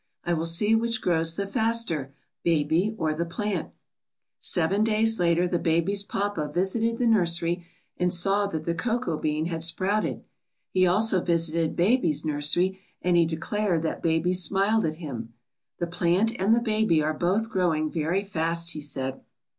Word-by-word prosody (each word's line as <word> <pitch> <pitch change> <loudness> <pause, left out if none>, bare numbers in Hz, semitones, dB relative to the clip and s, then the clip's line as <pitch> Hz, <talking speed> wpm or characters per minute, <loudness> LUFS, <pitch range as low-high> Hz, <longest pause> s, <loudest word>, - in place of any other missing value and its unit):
I 175 - 0
will 165 0 -1
see 205 +6 +3
which 230 0 +1
grows 165 -3 +1
the 200 - -2
faster, 220 - 0 0.3
baby 165 +6 +1
or 155 -4 0
the 165 +2 -2
plant.' 200 +5 -3 0.7
^^Seven 190 +4 +1
days 225 0 +2
later 175 0 +2
the 175 -1 -1
baby's 170 +5 +1
papa 200 -6 -3
visited 220 +7 0
the 245 - 0
nursery 175 -5 +1 0.3
and 180 0 +1
saw 195 +3 +2
that 160 -5 -5
the 170 - 0
cocoa 220 -3 -2
bean 155 +1 -1
had 165 -1 -3
sprouted. 190 +5 0 0.5
He 185 -1 +3
also 190 +1 +3
visited 165 -1 0
baby's 175 - +2
nursery 155 +6 +1 0.2
and 180 -1 +2
he 170 -1 +4
declared 170 +1 -1
that 160 - -3
baby 165 +2 +1
smiled 195 +4 +2
at 155 -1 -2
him. 120 -8 -7 0.4
The 175 - -1
plant 175 +5 +1
and 210 +4 +4
the 235 - +1
baby 215 -8 +1
are 155 +1 0
both 195 +8 0
growing 160 -6 0
very 170 +5 -1
fast,' 170 -3 -1
he 155 - -5
said. 135 -2 -3
175 Hz, 160 wpm, -26 LUFS, 160-205 Hz, 0.7 s, he